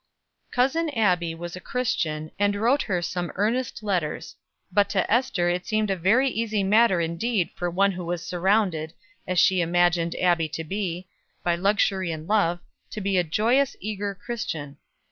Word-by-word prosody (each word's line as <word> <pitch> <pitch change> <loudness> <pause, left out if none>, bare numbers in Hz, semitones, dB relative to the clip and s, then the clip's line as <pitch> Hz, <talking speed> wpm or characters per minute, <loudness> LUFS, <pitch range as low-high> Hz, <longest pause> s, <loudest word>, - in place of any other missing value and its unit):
Cousin 275 +6 +1
Abbie 175 -6 +2
was 175 +1 -7
a - - -7
Christian, 165 -10 -2
and 205 0 +2
wrote 240 +8 +2
her 180 -4 -1
some 175 0 -3
earnest 225 +3 -1
letters; 180 -7 -2 0.4
but 200 +1 +3
to 195 +1 +1
Ester 225 -8 +1
it 180 +1 -2
seemed 215 -2 0
a - - +1
very 215 +10 +3
easy 220 -4 -1
matter 210 -1 +4
indeed 170 +4 -1
for 175 - -3
one 195 +3 +2
who 180 -1 -6
was 175 -1 -4
surrounded, 180 -3 0 0.3
as 185 - -1
she 185 +1 +4
imagined 175 0 +2
Abbie 170 -3 +2
to 165 +2 -4
be, 185 0 -4 0.4
by 175 -1 +2
luxury 190 -1 +1
and 160 0 -6
love, 185 -5 +2 0.3
to - - -6
be 200 -1 -1
a 180 - +4
joyous, 235 - +1
eager 205 0 -4
Christian. 160 - -5
190 Hz, 165 wpm, -25 LUFS, 175-215 Hz, 0.4 s, matter